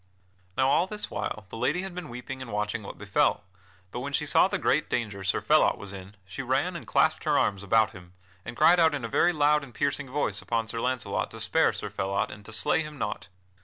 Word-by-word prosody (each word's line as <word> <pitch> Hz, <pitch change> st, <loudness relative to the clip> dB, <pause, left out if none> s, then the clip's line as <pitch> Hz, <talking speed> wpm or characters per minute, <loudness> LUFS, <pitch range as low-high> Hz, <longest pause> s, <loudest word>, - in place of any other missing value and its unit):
Now 130 Hz, -, +3 dB
all 170 Hz, +6 st, +3 dB
this 210 Hz, +1 st, -5 dB
while 110 Hz, -, -4 dB
the 115 Hz, -, -7 dB
lady 160 Hz, +10 st, 0 dB
had 190 Hz, -1 st, -6 dB
been 180 Hz, -4 st, -7 dB
weeping 125 Hz, +2 st, -7 dB
and 130 Hz, -, -7 dB
watching 105 Hz, +1 st, -2 dB
what 100 Hz, -, -9 dB
befell. 105 Hz, 0 st, +1 dB, 0.5 s
But 120 Hz, -, -4 dB
when 140 Hz, +3 st, -5 dB
she 140 Hz, +2 st, 0 dB
saw 150 Hz, -, +5 dB
the -, -, -1 dB
great 155 Hz, +3 st, +1 dB
danger 105 Hz, -5 st, -2 dB
Sir 95 Hz, -, +1 dB
Phelot -, -, +4 dB
was 100 Hz, -1 st, -9 dB
in, 95 Hz, +1 st, -10 dB
she 95 Hz, -, -6 dB
ran -, -, 0 dB
and -, -, -7 dB
clasped -, -, +2 dB
her -, -, +3 dB
arms 100 Hz, -1 st, +1 dB
about 110 Hz, +2 st, +3 dB
him, 90 Hz, -3 st, -14 dB, 0.3 s
and 115 Hz, +3 st, -8 dB
cried 175 Hz, +1 st, +6 dB
out 160 Hz, -2 st, +4 dB
in 135 Hz, -5 st, -4 dB
a -, -, -2 dB
very 175 Hz, +9 st, +3 dB
loud 150 Hz, -2 st, +3 dB
and 120 Hz, -5 st, -12 dB
piercing 140 Hz, -1 st, -1 dB
voice 125 Hz, -7 st, -1 dB
upon 115 Hz, -1 st, -1 dB
Sir 115 Hz, +1 st, -4 dB
Launcelot 125 Hz, -1 st, -1 dB
to -, -, -10 dB
spare -, -, +3 dB
Sir -, -, -5 dB
Phelot 100 Hz, +1 st, -1 dB
and 105 Hz, -, -10 dB
to 115 Hz, -, -10 dB
slay 115 Hz, +7 st, +1 dB
him 150 Hz, -1 st, -7 dB
not. 105 Hz, -4 st, -4 dB
115 Hz, 240 wpm, -27 LUFS, 105-145 Hz, 0.5 s, cried